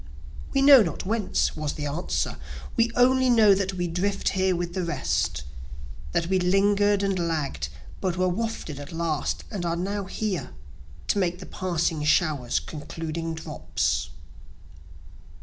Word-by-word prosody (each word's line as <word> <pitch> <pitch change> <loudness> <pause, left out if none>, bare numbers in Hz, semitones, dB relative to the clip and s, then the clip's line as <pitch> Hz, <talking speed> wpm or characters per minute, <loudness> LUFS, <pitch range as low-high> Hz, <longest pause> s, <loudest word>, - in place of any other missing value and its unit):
We 275 -1 +2
know 275 -3 +9
not 205 - -2
whence, 215 +1 0
(was 155 -2 -2
the 150 - -4
answer,) 150 +5 -2 0.4
We 230 0 +3
only 260 +1 +4
know 220 -4 +6
that 190 -1 -1
we 175 -1 -1
drift 195 +4 0
here 190 -1 +1
with 175 0 -3
the 185 - -1
rest, 170 - -1 0.7
That 165 - +1
we 190 +2 +1
linger'd 200 +2 +3
and 195 -2 0
lagg'd 150 - -2 0.3
but 185 -2 -1
were 185 0 +2
wafted 185 -6 -3
at 145 - -8
last, 165 -3 -2
and 195 -4 -3
are 170 -1 0
now 195 +3 -2
here, 195 - -3 0.6
To 205 - +2
make 180 -2 0
the 180 - -9
passing 170 -4 -1
shower's 150 -5 +2
concluding 165 +1 -5
drops. 75 - -2
180 Hz, 150 wpm, -26 LUFS, 160-200 Hz, 0.7 s, know